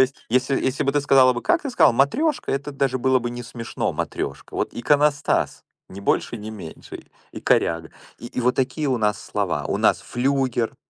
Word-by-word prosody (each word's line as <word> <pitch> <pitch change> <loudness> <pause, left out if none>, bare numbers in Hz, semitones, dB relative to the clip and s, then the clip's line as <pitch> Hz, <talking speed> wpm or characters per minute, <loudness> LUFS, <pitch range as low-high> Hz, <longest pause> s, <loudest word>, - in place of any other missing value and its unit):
есть, 130 +1 +2
если 130 +3 +1
если 130 +1 0
бы 140 - +1
ты 145 - +2
сказала 135 -2 +5
бы 120 - -4
как? 345 - +1
Ты 275 - -3
сказала: 245 - +5
"Матрёшка", 260 - +1
это 140 +2 -3
даже 135 -2 0
было 130 +1 +3
бы 120 -1 -4
не 120 0 -6
смешно, 115 0 -4
матрёшка. 70 -1 -4
Вот, - - -2
иконостас 145 +4 +1 0.2
ни 95 - -9
больше 100 - 0
ни 110 0 -7
меньше, 95 -7 -10 0.3
и - - -7
коряга. 80 -1 +1 0.3
И 120 - -8
и 125 - -4
вот 125 +1 +2
такие 135 +4 -1
у 125 - +1
нас 105 -2 +1
слова. - - -2
У - - -1
нас - - +3
флюгер. 125 -2 0
130 Hz, 200 wpm, -23 LUFS, 120-140 Hz, 0.3 s, сказала